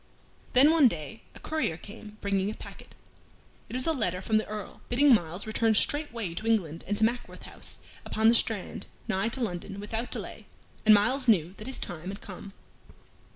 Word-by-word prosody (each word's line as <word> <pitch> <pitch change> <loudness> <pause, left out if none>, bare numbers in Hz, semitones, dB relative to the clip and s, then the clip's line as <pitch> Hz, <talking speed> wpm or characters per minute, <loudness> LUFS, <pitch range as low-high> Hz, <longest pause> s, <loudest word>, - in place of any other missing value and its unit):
Then 275 +5 +7
one 320 -5 +6
day 195 +3 -4
a - - -11
courier 310 - -1
came, 210 +2 -11
bringing 200 -1 0
a 215 - -5
packet. - - -12 0.7
It - - -6
was 255 - -2
a 325 - +3
letter 200 - 0
from 215 +3 +1
the - - -4
Earl, 210 -2 -7
bidding 270 +3 +5
Myles 175 -2 0
return 220 0 +2
straightway 235 - +1
to 215 +6 -5
England 170 -8 +1
and 205 +1 -1
to 220 - 0
Mackworth 235 +2 -1
House - - -7 0.3
upon 220 +1 +1
the 230 - +7
Strand, 225 -4 0 0.2
nigh 195 +4 +1
to 255 +3 -5
London, 195 -2 -4
without 220 +4 -4
delay, - - -7 0.4
and 215 - +10
Myles 255 +6 +3
knew 180 -6 +4
that 215 - -8
his 265 - -3
time 175 -1 -6
had 200 +1 -6
come. 195 0 -9
215 Hz, 190 wpm, -28 LUFS, 195-240 Hz, 0.7 s, and